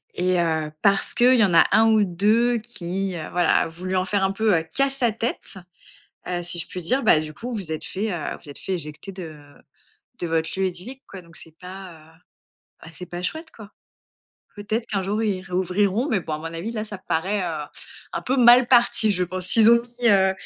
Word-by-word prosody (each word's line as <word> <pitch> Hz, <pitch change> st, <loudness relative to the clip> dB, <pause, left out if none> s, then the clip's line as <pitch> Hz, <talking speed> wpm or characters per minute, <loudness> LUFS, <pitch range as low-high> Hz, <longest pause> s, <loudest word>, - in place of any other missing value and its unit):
et 180 Hz, 0 st, +1 dB
heu, 160 Hz, -2 st, -1 dB
parce 200 Hz, -1 st, +2 dB
qu'il 250 Hz, +1 st, +5 dB
y 225 Hz, -, +4 dB
en 185 Hz, -4 st, +2 dB
a -, -, +7 dB
1 220 Hz, 0 st, +5 dB
ou 215 Hz, -1 st, +4 dB
2 215 Hz, +7 st, +2 dB
qui, 195 Hz, -4 st, -4 dB
heu, 160 Hz, -, -5 dB
voilà 175 Hz, -2 st, +2 dB
a -, -, -1 dB
voulu 185 Hz, +3 st, -5 dB
en 185 Hz, -, +1 dB
faire 195 Hz, 0 st, 0 dB
un 190 Hz, -, +1 dB
peu, 215 Hz, -1 st, +1 dB
heu, 160 Hz, -, -2 dB
qu'à 275 Hz, 0 st, +3 dB
sa 265 Hz, -4 st, 0 dB
tête, 225 Hz, -3 st, -5 dB, 0.7 s
heu, 175 Hz, -1 st, -2 dB
si 175 Hz, 0 st, -1 dB
je 170 Hz, -, -4 dB
puis 180 Hz, -, -7 dB
dire, 255 Hz, +11 st, 0 dB
bah 160 Hz, -8 st, +4 dB
du 155 Hz, -1 st, -8 dB
coup, 245 Hz, +2 st, -7 dB
vous 235 Hz, -, -3 dB
vous 180 Hz, -6 st, -5 dB
êtes 155 Hz, -, -4 dB
fait, 210 Hz, +3 st, -3 dB
heu, 165 Hz, -5 st, -4 dB
vous 150 Hz, -, -15 dB
êtes 140 Hz, -, -10 dB
fait 190 Hz, -, -5 dB
éjecter 160 Hz, +3 st, -7 dB
de 165 Hz, -5 st, -9 dB, 0.8 s
de 175 Hz, -, -3 dB
votre 160 Hz, 0 st, -1 dB
lieu 190 Hz, -, +2 dB
idyllique, 190 Hz, +10 st, -6 dB
quoi, 190 Hz, -2 st, -10 dB
donc 165 Hz, -1 st, -11 dB
c'est 160 Hz, -1 st, -12 dB
pas, 185 Hz, 0 st, -10 dB
heu, 160 Hz, 0 st, -18 dB, 0.7 s
ben 165 Hz, -, -11 dB
c'est 180 Hz, -, -8 dB
pas 175 Hz, +1 st, -7 dB
chouette 320 Hz, -, -5 dB
quoi. 215 Hz, -2 st, -13 dB, 0.8 s
Peut-être 215 Hz, +3 st, -3 dB
qu'un 200 Hz, -5 st, -2 dB
jour 210 Hz, +4 st, -2 dB
ils 195 Hz, -4 st, -1 dB
réouvriront, 190 Hz, -, 0 dB
mais 215 Hz, -9 st, +1 dB
bon 160 Hz, -, -6 dB
à -, -, -4 dB
mon 155 Hz, -, -11 dB
avis 200 Hz, +8 st, -4 dB
là 215 Hz, -2 st, -3 dB
ça 210 Hz, -2 st, -8 dB
paraît, 185 Hz, +3 st, -2 dB
heu, 160 Hz, -4 st, -3 dB, 0.5 s
un -, -, -3 dB
peu 260 Hz, -, -1 dB
mal 245 Hz, 0 st, +7 dB
parti 235 Hz, -3 st, +4 dB
je 185 Hz, -2 st, 0 dB
pense. 185 Hz, +1 st, -3 dB
S'ils 225 Hz, +3 st, +7 dB
ont 235 Hz, 0 st, +5 dB, 0.2 s
mis, 240 Hz, -, +4 dB
heu, 190 Hz, -2 st, +4 dB
190 Hz, 230 wpm, -23 LUFS, 175-220 Hz, 0.8 s, a